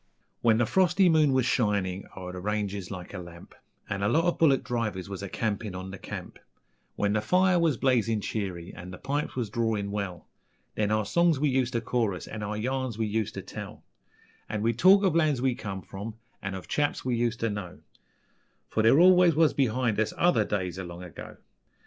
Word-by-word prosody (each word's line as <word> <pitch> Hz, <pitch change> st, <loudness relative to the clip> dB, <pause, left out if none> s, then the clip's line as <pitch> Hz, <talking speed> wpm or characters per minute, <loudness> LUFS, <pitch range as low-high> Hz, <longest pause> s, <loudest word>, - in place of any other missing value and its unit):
When 115 Hz, -2 st, +4 dB
the 120 Hz, -, +3 dB
frosty 185 Hz, -, +3 dB
moon 155 Hz, -3 st, +4 dB
was 130 Hz, -2 st, +2 dB
shinin' 100 Hz, -6 st, 0 dB
o'er 90 Hz, -1 st, -6 dB
the 90 Hz, -, -7 dB
ranges 100 Hz, -1 st, -2 dB
like 90 Hz, -2 st, -8 dB
a 100 Hz, -, -5 dB
lamp, 85 Hz, -1 st, -12 dB, 0.3 s
An' 100 Hz, 0 st, -3 dB
a 100 Hz, -, +2 dB
lot 160 Hz, +7 st, +3 dB
of 175 Hz, 0 st, 0 dB
bullick 140 Hz, -5 st, +4 dB
drivers 110 Hz, -6 st, -2 dB
was 95 Hz, -1 st, -6 dB
a 100 Hz, -, -5 dB
campin' 105 Hz, -2 st, -2 dB
on 95 Hz, +1 st, -6 dB
the 95 Hz, -, -8 dB
camp, -, -, -8 dB, 0.6 s
When 100 Hz, 0 st, 0 dB
the 110 Hz, -, +1 dB
fire 180 Hz, -, +3 dB
was 160 Hz, -6 st, +2 dB
blazin' 115 Hz, -5 st, +2 dB
cheery 95 Hz, -5 st, -4 dB
an' 90 Hz, +1 st, -9 dB
the 90 Hz, -, -8 dB
pipes 145 Hz, +6 st, -3 dB
was 120 Hz, -6 st, -3 dB
drawin' 110 Hz, -3 st, -1 dB
well, 100 Hz, -4 st, -4 dB, 0.5 s
Then 105 Hz, -1 st, 0 dB
our 110 Hz, 0 st, +1 dB
songs 170 Hz, +2 st, +2 dB
we 150 Hz, 0 st, +2 dB
useter 130 Hz, -3 st, 0 dB
chorus 110 Hz, -6 st, -1 dB
an' 105 Hz, -, -7 dB
our 105 Hz, +1 st, -3 dB
yarns 130 Hz, 0 st, -2 dB
we 110 Hz, -, 0 dB
useter 110 Hz, 0 st, -2 dB
tell; -, -, -8 dB, 0.7 s
An' 105 Hz, -1 st, -2 dB
we'd 115 Hz, +1 st, 0 dB
talk 195 Hz, +2 st, +7 dB
ov 185 Hz, -5 st, +2 dB
lands 155 Hz, -5 st, +3 dB
we 130 Hz, 0 st, +1 dB
come 100 Hz, -5 st, -6 dB
from, 105 Hz, +3 st, -7 dB, 0.3 s
and 95 Hz, -1 st, -4 dB
ov 95 Hz, -, -8 dB
chaps 145 Hz, -2 st, -1 dB
we 125 Hz, -2 st, +1 dB
useter 115 Hz, -1 st, 0 dB
know, 90 Hz, -4 st, -6 dB, 0.9 s
For 110 Hz, -, +1 dB
there 115 Hz, +7 st, +5 dB
always 180 Hz, -2 st, +6 dB
was 160 Hz, 0 st, +4 dB
behind 125 Hz, -4 st, +1 dB
us 110 Hz, -, 0 dB
OTHER 135 Hz, -12 st, +3 dB
days 95 Hz, -3 st, -2 dB
o' -, -, -4 dB
long 85 Hz, 0 st, -8 dB
ago. 90 Hz, -5 st, -10 dB
110 Hz, 200 wpm, -28 LUFS, 100-135 Hz, 0.9 s, talk